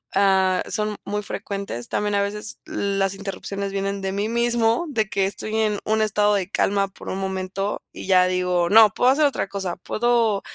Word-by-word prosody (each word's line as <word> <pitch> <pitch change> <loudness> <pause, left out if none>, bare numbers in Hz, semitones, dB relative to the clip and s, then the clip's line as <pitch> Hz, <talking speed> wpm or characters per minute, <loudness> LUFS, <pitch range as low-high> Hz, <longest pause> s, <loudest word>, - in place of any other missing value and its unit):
ah, 190 -2 +3
son 215 -1 -1
muy 210 +1 -2
frecuentes, 195 - -5
también 205 0 -1
a 200 - +2
veces 210 +4 -3
las 195 -1 -1
interrupciones 195 0 -5
vienen 195 0 -2
de 190 0 -2
mí 200 +2 -1
mismo, 235 +3 +1
de 220 -7 0
que 195 -2 0
estoy 215 +2 -5
en 215 -2 +1
un 220 0 +1
estado 210 -1 +2
de 195 -2 -1
calma 200 -1 +1
por 195 - -11
un 190 - -3
momento 190 +1 -3
y - - -9
ya 185 -1 +5
digo: 180 -1 +1
"No, 220 -1 +8
puedo 250 +5 +3
hacer 300 +2 +3
otra 280 -7 0
cosa, 190 -3 -4
puedo 230 -3 +1
200 Hz, 190 wpm, -23 LUFS, 195-215 Hz, -, No